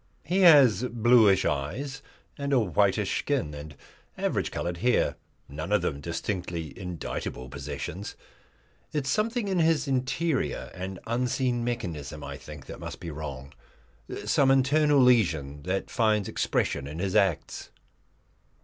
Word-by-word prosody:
He 180 +4 0
has 140 - +7
bluish 115 -5 +4
eyes 130 - -2 0.3
and 140 0 -2
a 130 - +5
whitish 95 -9 +1
skin, 75 - -1
and 75 0 -9 0.4
average - - -1
coloured 85 0 -3
hair 125 +7 +2 0.3
none 75 +7 -6
of 105 -4 +3
them 70 -5 -2
distinctly 85 -2 -4
indictable 85 -8 -5
possessions. 75 +8 -6 0.8
It 150 -3 -1
is 130 - 0
something 225 - 0
in 190 -2 0
his 160 -2 +2
interior 135 +3 -1
and 95 +1 -6
unseen 120 +1 0
mechanism, 80 - -4
I 70 -1 -6
think, 75 -3 -11
that - - -9
must - - -7
be 85 -2 -6
wrong; 70 -3 -7 0.7
some 135 -1 +3
internal 145 +2 +4
lesion 85 - +3
that 95 +1 -2
finds 110 -4 +2
expression 70 -1 -1
in 75 +2 -7
his 95 +1 -2
acts. 95 -5 +1
100 Hz, 135 wpm, -27 LUFS, -, 0.8 s, has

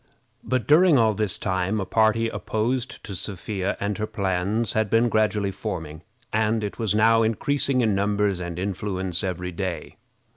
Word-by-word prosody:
But 130 -2 -1
during 160 +1 +6
all 110 -2 +4
this 105 -2 -1
time 95 +2 -1
a 95 - -2
party 110 +3 +2
opposed 120 +3 -2
to 100 - -7
Sophia 95 +1 -3
and 100 +1 -2
her 110 - -1
plans 100 +4 -1
had 110 -2 +1
been 115 +3 +3
gradually 105 -2 +1
forming, 85 -6 -5 0.3
and 110 0 +1
it 105 - -5
was 110 -3 0
now 115 +1 +5
increasing 130 +4 +1
in 110 -3 +2
numbers 100 -1 +1
and 85 -1 -5
influence 95 -2 -2
every 90 -1 -3
day. 85 -2 -5
105 Hz, 160 wpm, -24 LUFS, 95-110 Hz, 0.3 s, during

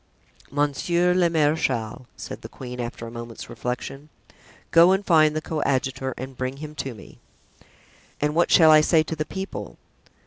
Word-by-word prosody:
"Monsieur 160 +5 +1
le 180 -1 +3
marechal," 145 -7 0
said - - -8
the - - -9
queen, 125 -1 -8
after 120 -1 -5
a 115 - -8
moment's 115 -1 -8
reflection, 135 +4 -5 0.6
"go 170 +3 +7
and 195 +1 -1
find 155 -3 +4
the 155 - -2
coadjutor 135 -3 -1
and 130 +1 -7
bring 130 +2 -4
him 150 +1 -8
to 135 -5 -5
me." 95 -4 -14 1.0
"And 150 0 0
what 170 +2 +2
shall 160 -2 +7
I 155 0 +8
say 160 +1 +3
to 160 - -5
the 155 0 -3
people?" 190 - -6
145 Hz, 165 wpm, -24 LUFS, 130-160 Hz, 1.0 s, I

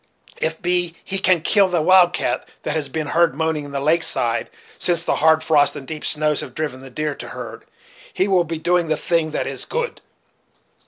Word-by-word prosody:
If 160 - 0
so - - -24
be 175 -1 +1
he 195 - -3
can 185 -3 +3
kill 200 +3 +4
the 180 -2 0
wild 180 +2 +6
cat - - -2
that 155 - -2
has 150 -3 -2
been 155 +2 -3
heard 165 -1 +2
moaning 160 -1 -1
on - - -11
the 140 - -2
lake 155 +4 +2
side - - 0 0.3
since 170 -2 +1
the - - 0
hard 160 +1 +4
frosts 150 -3 +3
and 140 -2 -7
deep 155 -1 -6
snows 150 -1 +1
have - - -9
driven 145 -5 -4
the 135 - -10
deer 150 +3 -2
to - - -9
herd, - - -8 0.5
he 190 - 0
will 185 -3 +3
be 165 0 -4
doing 175 +1 +1
the 155 -1 0
thing 165 -3 0
that 155 - -2
is - - -5
good. 480 0 -3
160 Hz, 220 wpm, -21 LUFS, 150-175 Hz, 0.5 s, wild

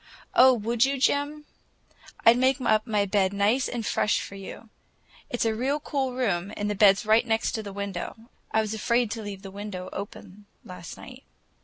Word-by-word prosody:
"Oh, 260 +1 +7
would 230 +1 +1
you, 275 +1 +1
Jim? 290 +2 0 0.8
I'd 230 - +8
make 260 +2 +2
up 215 -2 +1
my 210 -2 +1
bed 195 -1 +1
nice 210 +6 +2
and 235 -3 -4
fresh 210 - +1
for - - -7
you. 200 +3 -10 0.6
It's 245 - -1
a 225 - +2
real 265 +6 -1
cool 270 -4 -2
room, 200 -7 -1
and 205 0 -1
the - - 0
bed's 200 0 +4
right 220 +2 +4
next 225 +1 +1
the 200 - -7
window. 200 -3 -5 0.3
I 220 - +2
was 215 0 -3
afraid 235 +1 +1
to 225 -1 -4
leave 200 -2 -7
the 195 - -8
window 195 -2 -6
open 205 0 -9 0.2
last 180 -3 -9
night." - - -12
215 Hz, 185 wpm, -26 LUFS, 200-245 Hz, 0.8 s, I'd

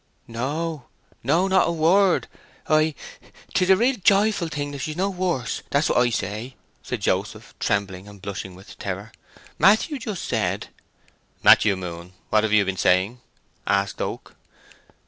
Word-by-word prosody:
"No, 145 +4 -4 0.4
no—not 185 +8 +3
a - - +1
word 175 +4 +3 0.4
I—'tis 155 +4 -1
a 190 - +8
real 245 +4 +2
joyful 200 -2 +3
thing 145 -2 -4
that 140 - -7
she's 155 +3 -4
no 195 +2 0
worse, 175 -9 -2
that's 145 +2 +1
what - - +3
I 120 0 +3
say," 110 +3 -4 0.3
said - - -5
Joseph, - - -2
trembling 100 -1 -1
and 100 -1 -13
blushing 95 -1 -6
with 95 +2 -14
terror. - - -5 0.5
"Matthew 220 +9 +4
just 215 -6 -5
said—" 105 -3 -1 0.7
"Matthew 100 -2 +6
Moon, 90 -1 -8 0.2
what 110 0 +4
have 110 - 0
you 105 -1 +4
been 95 0 -3
saying?" 95 +9 +2 0.5
asked 100 0 0
Oak. - - -5
135 Hz, 145 wpm, -23 LUFS, -, 0.7 s, a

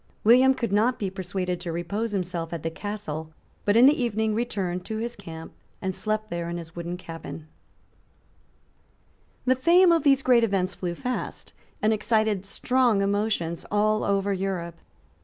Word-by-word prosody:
William 255 +4 +6
could 235 -5 -2
not 225 +5 +3
be 195 -3 -3
persuaded 185 -1 -3
to 170 - -4
repose 200 +7 -2
himself 175 -4 -3
at 170 -3 -5
the 165 - -2
Castle, 160 -5 -5 0.3
but 205 - +3
in 240 - +8
the 285 0 +5
evening 220 -2 0
returned 195 -6 -2
to 220 +2 -4
his 235 +2 -3
camp, 165 -4 -9 0.3
and 190 0 -2
slept 215 +2 -2
there 170 0 -3
in 170 - -3
his 165 -1 -9
wooden 175 +1 -4
cabin, 165 -2 -9 2.0
The 255 0 +4
fame 345 +7 +5
of 335 -1 +4
these 275 -2 +4
great 245 -2 +5
events 195 -4 +1
flew 175 -2 -4
fast, 250 +7 -4 0.3
and 215 +1 +4
excited 215 -2 +1
strong 240 -1 +2
emotions 200 -5 -1
all 215 +1 +2
over 200 0 +1
Europe. 185 -3 -3
200 Hz, 160 wpm, -26 LUFS, 175-230 Hz, 2.0 s, in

